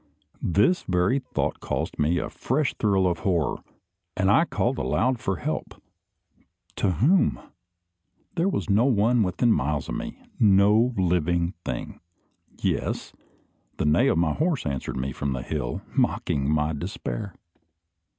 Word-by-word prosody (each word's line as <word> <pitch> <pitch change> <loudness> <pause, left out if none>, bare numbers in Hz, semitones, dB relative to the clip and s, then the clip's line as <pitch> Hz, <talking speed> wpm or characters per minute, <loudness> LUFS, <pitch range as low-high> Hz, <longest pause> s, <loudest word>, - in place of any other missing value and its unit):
This 105 - +2
very 90 +8 +2
thought - - -3
caused - - -3
me 80 +4 +2
a 80 - -2
fresh 135 +2 -1
thrill 100 -3 +1
of 90 -2 0
horror, 85 -8 0 0.6
and 95 +1 +3
I 130 +10 +5
called 130 -5 -1
aloud 125 0 +1
for 95 - -1
help. - - -4 1.0
To 95 - +1
whom? 160 - +3 0.9
There 180 +3 +1
was 190 - -2
no 105 +4 +3
one 120 -1 +3
within 105 +5 +2
miles 75 +1 -1
of - - -3
me - - -5 0.2
no 105 +3 +5
living 85 -1 +1
thing. - - -5 0.6
Yes! - - -2 0.6
the - - -1
neigh 75 0 +4
of - - +2
my 85 -2 +2
horse 160 -3 0
answered 70 -3 -3
me 65 +2 -2
from 70 +1 -2
the 65 0 -4
hill, - - -3
mocking 70 0 0
my 75 +1 +1
despair. 95 +4 -5
95 Hz, 140 wpm, -25 LUFS, 80-120 Hz, 1.0 s, I